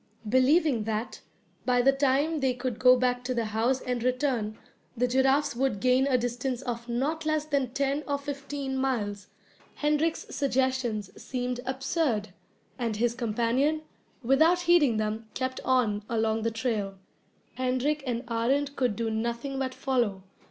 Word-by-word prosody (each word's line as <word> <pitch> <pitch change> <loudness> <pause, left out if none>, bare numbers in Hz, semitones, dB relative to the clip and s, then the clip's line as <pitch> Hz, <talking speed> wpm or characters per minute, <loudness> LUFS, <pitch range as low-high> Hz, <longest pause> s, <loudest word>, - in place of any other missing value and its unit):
Believing 260 0 +3
that, 220 +1 -3 0.4
by 245 -1 +2
the 270 - +6
time 280 +3 +1
they 260 -2 +1
could 245 -2 -3
go 255 0 +7
back 250 0 0
to 250 0 -2
the 230 -1 0
house 225 +5 0
and 250 -2 -2
return, 250 -4 0 0.4
the 250 +2 +2
giraffes 265 +2 +2
would 260 -5 0
gain 255 +4 +3
a 260 -2 +3
distance 245 +1 -2
of 235 -2 -5
not 285 +7 -1
less 310 -1 0
than 280 -4 0
ten 275 +3 -1
or 285 -1 0
fifteen 280 -1 -4
miles, 205 -7 -2 0.5
Hendrik's 300 +2 0
suggestions 260 -6 0
seemed 250 -1 -3
absurd, 265 - 0 0.5
and 230 -3 -1
his 235 +2 +1
companion, 245 +6 0 0.4
without 315 +8 +4
heeding 340 -9 +4
them, 215 +1 -2
kept 260 0 -2
on 230 -6 +1
along 220 -1 +1
the 230 - +1
trail. 220 -4 -2 0.6
Hendrik 255 +4 0
and 240 0 -1
Arend 270 +5 0
could 250 -6 +1
do 225 +1 -2
nothing 235 +5 -2
but 260 -1 -2
follow. 235 -8 0
255 Hz, 150 wpm, -28 LUFS, 230-275 Hz, 0.6 s, go